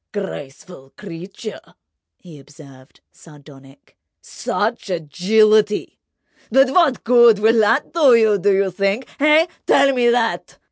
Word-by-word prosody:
"Graceful 145 Hz, -6 st, -9 dB
creature!" 195 Hz, +3 st, -11 dB, 0.4 s
he 165 Hz, -5 st, -16 dB
observed, 140 Hz, -2 st, -18 dB
sardonic. 140 Hz, -3 st, -19 dB, 0.2 s
"Such 215 Hz, 0 st, -5 dB
agility! 210 Hz, +6 st, 0 dB, 0.5 s
But 270 Hz, +3 st, +2 dB
what 315 Hz, -6 st, +1 dB
good 235 Hz, -2 st, +4 dB
will 225 Hz, +2 st, +2 dB
that 225 Hz, +8 st, 0 dB
do 290 Hz, -8 st, +4 dB
you, 220 Hz, -3 st, +2 dB
do 200 Hz, +2 st, +1 dB
you 195 Hz, 0 st, 0 dB
think? 200 Hz, +7 st, -2 dB
Eh? 305 Hz, +3 st, +3 dB, 0.2 s
Tell 275 Hz, 0 st, +3 dB
me 245 Hz, -2 st, +1 dB
that!" 235 Hz, -1 st, -2 dB
210 Hz, 120 wpm, -18 LUFS, 165-240 Hz, 0.5 s, good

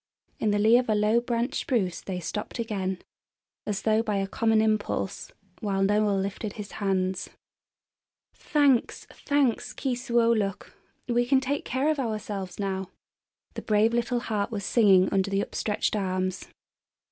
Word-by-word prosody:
In 215 Hz, -, +1 dB
the 205 Hz, -, +2 dB
lee 220 Hz, +4 st, +5 dB
of 250 Hz, -, -3 dB
a 215 Hz, -, +3 dB
low 210 Hz, +2 st, +3 dB
branched 240 Hz, +2 st, -1 dB
spruce 195 Hz, -9 st, -1 dB
they 185 Hz, -2 st, -4 dB
stopped 210 Hz, +8 st, -5 dB
again, 195 Hz, -5 st, -3 dB, 0.6 s
as 205 Hz, -1 st, -2 dB
though 220 Hz, 0 st, +3 dB
by 215 Hz, -3 st, -2 dB
a 195 Hz, 0 st, 0 dB
common 220 Hz, +3 st, +1 dB
impulse, 215 Hz, -3 st, -1 dB, 0.3 s
while 195 Hz, -2 st, 0 dB
Noel 205 Hz, 0 st, +2 dB
lifted 200 Hz, +2 st, -3 dB
his 210 Hz, -1 st, -8 dB
hands. 190 Hz, -2 st, -1 dB, 1.0 s
"Thanks, 280 Hz, -5 st, +1 dB
thanks, 285 Hz, -5 st, 0 dB
Keesuolukh; 235 Hz, -5 st, 0 dB, 0.4 s
we 240 Hz, 0 st, +1 dB
can 270 Hz, 0 st, +4 dB
take 275 Hz, +2 st, -2 dB
care 260 Hz, +4 st, 0 dB
of 310 Hz, -2 st, +1 dB
ourselves 210 Hz, -6 st, -4 dB
now," 190 Hz, -2 st, -2 dB, 0.6 s
the -, -, -6 dB
brave 215 Hz, +2 st, +2 dB
little 240 Hz, +1 st, 0 dB
heart 210 Hz, -3 st, -2 dB
was 205 Hz, -4 st, -4 dB
singing 195 Hz, -5 st, +5 dB
under 195 Hz, 0 st, +1 dB
the 195 Hz, 0 st, +1 dB
upstretched 210 Hz, +1 st, -1 dB
arms. 185 Hz, -2 st, -2 dB
215 Hz, 145 wpm, -27 LUFS, 195-235 Hz, 1.0 s, lee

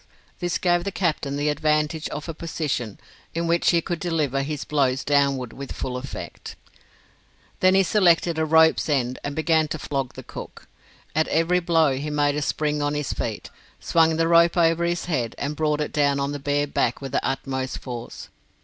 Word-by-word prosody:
This 175 Hz, -2 st, -1 dB
gave 175 Hz, -1 st, +2 dB
the 200 Hz, -, -3 dB
captain 160 Hz, -8 st, -1 dB
the 145 Hz, +1 st, 0 dB
advantage 150 Hz, +1 st, 0 dB
of 150 Hz, +2 st, -6 dB
a 165 Hz, -, -4 dB
position 150 Hz, -9 st, -3 dB, 0.4 s
in 170 Hz, 0 st, -1 dB
which 170 Hz, +1 st, +2 dB
he 170 Hz, -1 st, +3 dB
could 170 Hz, 0 st, -3 dB
deliver 155 Hz, -6 st, 0 dB
his 150 Hz, +1 st, -4 dB
blows 135 Hz, -3 st, +1 dB
downward 140 Hz, -4 st, +1 dB
with 140 Hz, 0 st, -8 dB
full 125 Hz, -, -4 dB
effect. 125 Hz, +1 st, -7 dB, 1.0 s
Then 185 Hz, 0 st, +4 dB
he 195 Hz, -, +5 dB
selected 175 Hz, -4 st, +3 dB
a -, -, +2 dB
rope's 160 Hz, 0 st, +4 dB
end 130 Hz, -3 st, 0 dB
and 145 Hz, 0 st, -4 dB
began 160 Hz, 0 st, +2 dB
to 155 Hz, -, -4 dB
flog 135 Hz, -3 st, -3 dB
the -, -, -8 dB
cook. -, -, -10 dB, 0.5 s
At 160 Hz, 0 st, +2 dB
every 165 Hz, +3 st, +2 dB
blow 165 Hz, -5 st, +2 dB
he 145 Hz, +3 st, -4 dB
made 145 Hz, -1 st, +1 dB
a 150 Hz, -, -2 dB
spring 150 Hz, +1 st, -1 dB
on 145 Hz, 0 st, 0 dB
his 150 Hz, -1 st, -2 dB
feet, -, -, -4 dB, 0.3 s
swung 160 Hz, -1 st, +3 dB
the 165 Hz, 0 st, +2 dB
rope 170 Hz, +1 st, +5 dB
over 165 Hz, 0 st, +3 dB
his 175 Hz, 0 st, -1 dB
head, 125 Hz, -10 st, -2 dB
and 145 Hz, +2 st, -3 dB
brought 150 Hz, -1 st, 0 dB
it 150 Hz, -, -3 dB
down 140 Hz, -1 st, +2 dB
on 140 Hz, +1 st, -1 dB
the 145 Hz, -, -4 dB
bare 145 Hz, +1 st, 0 dB
back 125 Hz, -4 st, 0 dB
with 135 Hz, -2 st, -6 dB
the -, -, 0 dB
utmost 135 Hz, -1 st, -2 dB
force. 120 Hz, -2 st, -8 dB
150 Hz, 195 wpm, -24 LUFS, 140-165 Hz, 1.0 s, he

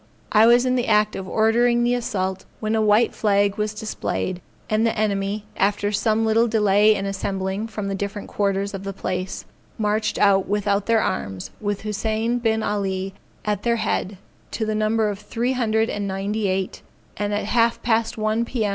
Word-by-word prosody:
I 220 Hz, +1 st, +6 dB
was 240 Hz, +1 st, +5 dB
in 255 Hz, 0 st, +2 dB
the 245 Hz, -, 0 dB
act 210 Hz, -1 st, +3 dB
of 190 Hz, -, -5 dB
ordering 235 Hz, +2 st, +3 dB
the 240 Hz, +1 st, +2 dB
assault, 190 Hz, -6 st, -2 dB
when 215 Hz, 0 st, -1 dB
a 220 Hz, -, +2 dB
white 215 Hz, +2 st, +3 dB
flag 200 Hz, -1 st, +2 dB
was 210 Hz, 0 st, 0 dB
displayed; 210 Hz, -4 st, -3 dB, 0.3 s
and 215 Hz, +1 st, +1 dB
the 230 Hz, 0 st, +1 dB
enemy, 205 Hz, 0 st, -1 dB
after 205 Hz, +1 st, +1 dB
some 220 Hz, +1 st, +1 dB
little 225 Hz, +2 st, +3 dB
delay 210 Hz, -1 st, +4 dB
in 195 Hz, -1 st, -3 dB
assembling 195 Hz, +1 st, -2 dB
from 210 Hz, -3 st, -5 dB
the 195 Hz, -, -2 dB
different 200 Hz, +1 st, -4 dB
quarters 200 Hz, 0 st, -1 dB
of 195 Hz, 0 st, -5 dB
the 195 Hz, 0 st, -4 dB
place, 185 Hz, 0 st, -4 dB, 0.3 s
marched 215 Hz, 0 st, 0 dB
out 195 Hz, -2 st, +4 dB
without 200 Hz, 0 st, 0 dB
their 230 Hz, -1 st, +3 dB
arms, 95 Hz, -, -3 dB
with 205 Hz, -1 st, -2 dB
Hussein 220 Hz, +3 st, -1 dB
Bin 220 Hz, -2 st, +1 dB
Alley 195 Hz, -2 st, -2 dB, 0.3 s
at 210 Hz, -2 st, 0 dB
their 235 Hz, +1 st, +1 dB
head, 205 Hz, -3 st, -2 dB, 0.3 s
to 220 Hz, -, -2 dB
the 215 Hz, -, -1 dB
number 215 Hz, +1 st, +1 dB
of 205 Hz, -1 st, -3 dB
three 235 Hz, +4 st, -2 dB
hundred 225 Hz, -3 st, +1 dB
and 205 Hz, -2 st, -3 dB
ninety 200 Hz, +2 st, -2 dB
eight; 190 Hz, 0 st, -2 dB, 0.4 s
and 205 Hz, 0 st, -1 dB
at 205 Hz, 0 st, -1 dB
half 230 Hz, +1 st, +2 dB
past 225 Hz, -1 st, +1 dB
one 215 Hz, +1 st, +1 dB
P.M. 230 Hz, -3 st, -1 dB
210 Hz, 185 wpm, -23 LUFS, 200-225 Hz, 0.4 s, I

